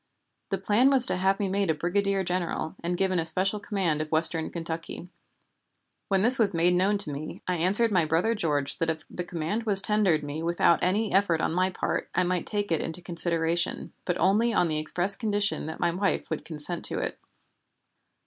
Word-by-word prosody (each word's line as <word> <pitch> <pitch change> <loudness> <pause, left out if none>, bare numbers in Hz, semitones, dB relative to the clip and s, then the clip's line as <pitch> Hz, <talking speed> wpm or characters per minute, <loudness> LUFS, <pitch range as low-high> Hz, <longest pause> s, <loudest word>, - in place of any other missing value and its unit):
The 195 - -1
plan 210 +7 +2
was 265 -3 +7
to - - -2
have 190 +2 0
me 200 - -1
made 195 0 -1
a 160 - +1
brigadier 195 +4 -1
general, 175 -3 -3
and 175 +1 -2
given 185 -1 0
a - - -1
special 195 +5 +3
command 190 -7 -2
of 155 - -6
western 160 0 +1
Kentucky. 165 +1 -6 1.0
When 195 -1 +1
this 250 +3 +7
was 200 -5 +4
made 170 +2 +2
known 190 +3 +1
to 200 -7 +1
me 145 +2 -8
I 180 -1 -1
answered 205 +7 +3
my 180 -5 +2
brother 165 +9 +1
George 145 -9 -2
that 165 - -1
if 160 0 -4
the 180 - -5
command 175 +7 -4
was 200 -2 +9
tendered 195 -7 +2
me 145 +2 -6
without 170 0 +1
any 205 +4 0
effort 190 -4 +2
on 160 - -1
my 185 +2 +1
part 185 - -3
I 185 - +2
might 180 -1 -2
take 205 -3 -3
it 160 - 0
into 165 +2 -7
consideration, 170 0 -1
but 180 - -2
only 215 +5 +2
on 175 - +2
the 155 -1 -2
express 175 +5 0
condition 205 -6 -1
that 160 - -7
my 175 - +1
wife 190 +1 -2
would 160 - -4
consent 160 +2 -4
to - - -2
it. - - -4
180 Hz, 205 wpm, -26 LUFS, 165-200 Hz, 1.0 s, was